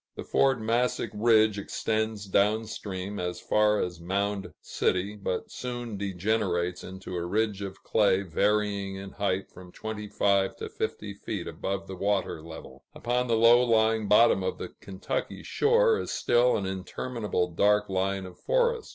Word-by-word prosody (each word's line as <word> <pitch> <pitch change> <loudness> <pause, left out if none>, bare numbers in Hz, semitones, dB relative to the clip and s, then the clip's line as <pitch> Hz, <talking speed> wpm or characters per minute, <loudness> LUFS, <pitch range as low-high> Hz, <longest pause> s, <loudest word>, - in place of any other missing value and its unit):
The - - -6
Fort 135 -2 +2
Massac 115 +3 0
ridge 110 -1 +4
extends 110 0 -2
down 105 +3 +2
stream 100 -1 -5
as 90 0 -3
far 105 0 +2
as 90 -2 -3
Mound 100 +3 -2
City, 95 +3 -1
but 95 -3 -4
soon 120 -3 -5
degenerates 95 -2 -1
into 95 0 -8
a 85 - -2
ridge 105 +2 0
of 95 -1 -7
clay 100 -3 +3
varying 100 +2 0
in 95 0 -7
height 100 -2 -2
from 90 0 -13
twenty 110 +1 -6
five 100 -2 +1
to - - -6
fifty 105 -1 -4
feet 100 - -5
above 95 0 -4
the 95 - -7
water 95 -4 -1
level. 80 -5 -11
Upon 125 +1 -1
the 115 -1 +2
low 115 +2 +7
lying 110 -2 +2
bottom 105 -1 +5
of 95 - -2
the - - -6
Kentucky 95 -1 -5
shore, 465 0 +3
is - - -4
still 120 +1 +3
an 100 - -3
interminable 95 0 -3
dark 105 +5 +3
line 95 0 -1
of 90 - -12
forest. 485 -2 +1
100 Hz, 160 wpm, -28 LUFS, 95-110 Hz, -, low